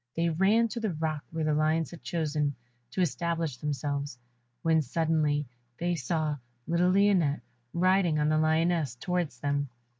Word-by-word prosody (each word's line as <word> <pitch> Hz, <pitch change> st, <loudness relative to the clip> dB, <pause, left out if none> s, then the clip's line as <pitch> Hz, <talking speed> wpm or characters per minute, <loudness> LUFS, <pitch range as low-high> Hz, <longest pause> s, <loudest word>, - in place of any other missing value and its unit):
They 170 Hz, +1 st, +1 dB
ran 200 Hz, +8 st, +3 dB
to 235 Hz, -, -4 dB
the 215 Hz, -5 st, -1 dB
rock 155 Hz, -1 st, -2 dB
where 165 Hz, -1 st, -3 dB
the 155 Hz, 0 st, +2 dB
lions 155 Hz, 0 st, +1 dB
had 170 Hz, -, -10 dB
chosen 150 Hz, -4 st, -1 dB, 0.3 s
to 185 Hz, -, -2 dB
establish 165 Hz, -1 st, -1 dB
themselves, 140 Hz, -1 st, -3 dB, 0.5 s
when 160 Hz, -1 st, +4 dB
suddenly 150 Hz, 0 st, +1 dB, 0.3 s
they 175 Hz, +1 st, 0 dB
saw 155 Hz, 0 st, -1 dB, 0.3 s
little 170 Hz, +2 st, +2 dB
Lionette 185 Hz, -6 st, +3 dB, 0.3 s
riding 185 Hz, -2 st, +3 dB
on 150 Hz, 0 st, +2 dB
the 155 Hz, 0 st, +3 dB
lioness 160 Hz, -3 st, +2 dB
towards 170 Hz, -1 st, -2 dB
them. 145 Hz, -1 st, 0 dB
160 Hz, 150 wpm, -29 LUFS, 150-170 Hz, 0.5 s, when